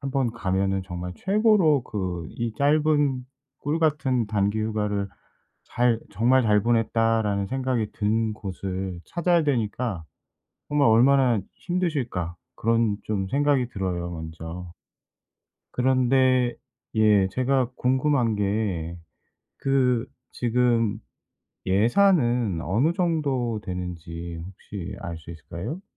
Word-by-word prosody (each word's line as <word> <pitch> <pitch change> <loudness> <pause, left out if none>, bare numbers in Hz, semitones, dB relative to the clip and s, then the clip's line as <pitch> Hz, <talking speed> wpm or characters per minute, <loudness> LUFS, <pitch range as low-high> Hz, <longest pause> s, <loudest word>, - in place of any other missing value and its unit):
한번 135 -3 0
가면은 95 -3 0
정말 90 -1 -5
최고로 195 - +3
그 90 -7 -4
이 115 -1 -3
짧은 145 -3 +2 0.3
꿀 150 +3 -1
같은 135 -7 +1
단기 105 0 0
휴가를 105 -2 -1 0.6
잘 120 -2 +1
'정말 125 +6 +3
잘 105 -3 +3
보냈다.'라는 115 -3 +1
생각이 130 -4 -1
든 110 +1 0
곳을 95 -2 -5
찾아야 170 0 +2
되니까 115 - -1 0.7
정말 145 -2 +3
'얼마나 125 -1 +4
힘드실까.' 135 - -2 0.2
그런 115 -2 +1
좀 100 -3 -2
생각이 140 -1 +2
들어요 90 -5 -3
먼저. 80 +2 -7 1.0
그런데 130 -1 +3 0.4
예 105 -3 +4
제가 130 +1 +1
궁금한 130 -2 +1
게 100 -5 -1 0.7
그 125 -3 +2 0.3
지금 115 -3 +1 0.7
예산은 120 - +3
어느 125 - +1
정도 140 -10 0
되는지 85 -2 -6
혹시 100 0 -8
알 85 -3 -5
수 80 - -14
있을까요? 85 - -6
115 Hz, 215 characters per minute, -25 LUFS, 95-130 Hz, 1.0 s, 얼마나